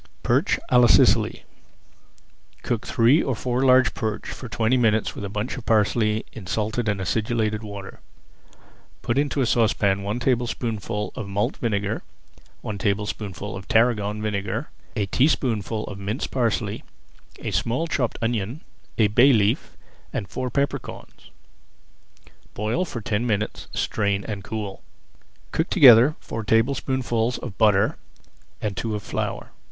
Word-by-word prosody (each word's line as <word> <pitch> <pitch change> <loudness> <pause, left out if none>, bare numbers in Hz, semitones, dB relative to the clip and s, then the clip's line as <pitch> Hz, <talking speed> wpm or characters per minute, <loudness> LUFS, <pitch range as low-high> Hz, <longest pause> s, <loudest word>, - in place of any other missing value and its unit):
PERCH - - +2
À 125 - +6
LA 120 - +6
SICILY - - +4 1.2
Cook 115 -3 -2
three 120 +8 +4
or 130 - -1
four 125 +2 -1
large 130 -2 +5
perch 110 -2 -3
for 125 - -7
twenty 115 +2 +1
minutes 110 -3 +2
with - - -7
a 100 - -4
bunch 105 +6 -3
of 130 - -8
parsley 110 0 +2
in 100 -5 -9
salted 110 +3 -1
and 100 -1 -1
acidulated 110 +2 -1
water. 100 -2 -8 1.0
Put 120 +3 +1
into 145 -1 0
a - - +3
saucepan 105 -4 +2
one 105 +4 -2
tablespoonful 115 -4 -1
of 105 - -5
malt 100 +1 -1
vinegar, 105 -2 -1 0.6
one 105 -1 -5
tablespoonful 105 -1 -3
of 95 -1 -9
tarragon 105 -2 +2
vinegar, 110 +5 -3 0.2
a 105 -3 0
teaspoonful 115 -3 +1
of 100 - -8
minced 100 +5 -3
parsley, 115 -4 -1 0.5
a - - -5
small 125 +8 0
chopped 135 -8 -1
onion, 115 - -2 0.4
a 110 - +5
bay 120 +7 +5
leaf, 105 -4 +1 0.3
and 100 - -3
four 130 +5 -3
pepper 140 +4 0
corns. - - -12 1.3
Boil 110 - -1
for 120 -8 -6
ten 110 +3 -1
minutes, 105 -1 -2
strain, 100 -2 -1
and 100 -3 -5
cool. 105 -1 -5 0.7
Cook 160 - -1
together 135 - +7
four 115 - -6
tablespoonfuls 120 +1 +1
of 115 -6 -7
butter 105 -1 +3 0.6
and 105 -2 -3
two 110 +1 -2
of 105 - -5
flour. - - -4
110 Hz, 140 wpm, -24 LUFS, 105-120 Hz, 1.3 s, together